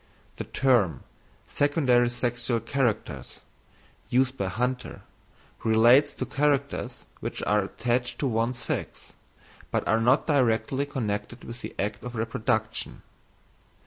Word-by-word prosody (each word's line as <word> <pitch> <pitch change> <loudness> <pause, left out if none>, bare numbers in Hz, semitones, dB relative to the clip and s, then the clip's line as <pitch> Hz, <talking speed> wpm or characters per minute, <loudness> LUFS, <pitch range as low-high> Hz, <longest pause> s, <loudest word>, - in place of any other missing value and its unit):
The - - -4
term, 120 -10 +2 0.4
secondary 135 -5 +3
sexual 120 0 -1
characters, 120 0 -2 0.7
used 130 +1 +2
by 100 -6 -2
Hunter, 125 +6 -3 0.6
relates 120 +6 +5
to - - -4
characters 140 -1 -1
which - - -5
are 105 -1 +2
attached 125 +4 -1
to 140 - 0
one 115 +1 0
sex, 120 - -5 0.6
but - - -1
are 110 - +3
not 125 +5 +4
directly 130 -1 +1
connected 115 -3 -3
with 120 +1 -9
the - - -7
act 100 +1 -2
of 125 0 -6
reproduction. 110 -1 -2
120 Hz, 115 wpm, -27 LUFS, 110-130 Hz, 0.7 s, relates